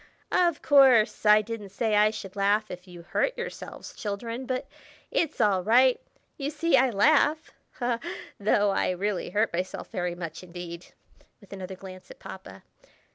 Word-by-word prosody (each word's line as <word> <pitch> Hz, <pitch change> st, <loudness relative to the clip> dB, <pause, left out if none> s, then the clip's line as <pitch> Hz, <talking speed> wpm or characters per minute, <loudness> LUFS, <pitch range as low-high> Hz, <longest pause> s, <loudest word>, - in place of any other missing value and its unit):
"Of 345 Hz, -4 st, +2 dB
course! 255 Hz, -7 st, +5 dB
I 210 Hz, 0 st, +7 dB
didn't 215 Hz, -2 st, -6 dB
say 215 Hz, +2 st, 0 dB
I 210 Hz, +1 st, +5 dB
should 210 Hz, -2 st, -8 dB
laugh 205 Hz, +2 st, +1 dB
if 180 Hz, +1 st, -9 dB
you 175 Hz, -1 st, -11 dB
hurt -, -, -1 dB
yourselves, 475 Hz, -, -7 dB
children, 230 Hz, +5 st, -5 dB
but 255 Hz, 0 st, -2 dB, 0.5 s
it's 320 Hz, -2 st, -1 dB
all 200 Hz, -5 st, +3 dB
right. 250 Hz, +4 st, +4 dB, 0.4 s
You 280 Hz, -1 st, -2 dB
see 320 Hz, +3 st, +1 dB
I 260 Hz, +1 st, +4 dB
laugh, 300 Hz, +7 st, +3 dB, 0.9 s
though 205 Hz, 0 st, +2 dB
I -, -, 0 dB
really 190 Hz, +1 st, -2 dB
hurt 210 Hz, +3 st, 0 dB
myself 180 Hz, +2 st, -4 dB
very 180 Hz, -4 st, -2 dB
much 170 Hz, -2 st, -7 dB
indeed" 175 Hz, -1 st, -9 dB, 0.5 s
(with 200 Hz, -2 st, -14 dB
another 190 Hz, -1 st, -7 dB
glance 185 Hz, 0 st, -12 dB
at -, -, -12 dB
Papa)! -, -, -11 dB
210 Hz, 155 wpm, -27 LUFS, 185-255 Hz, 0.9 s, I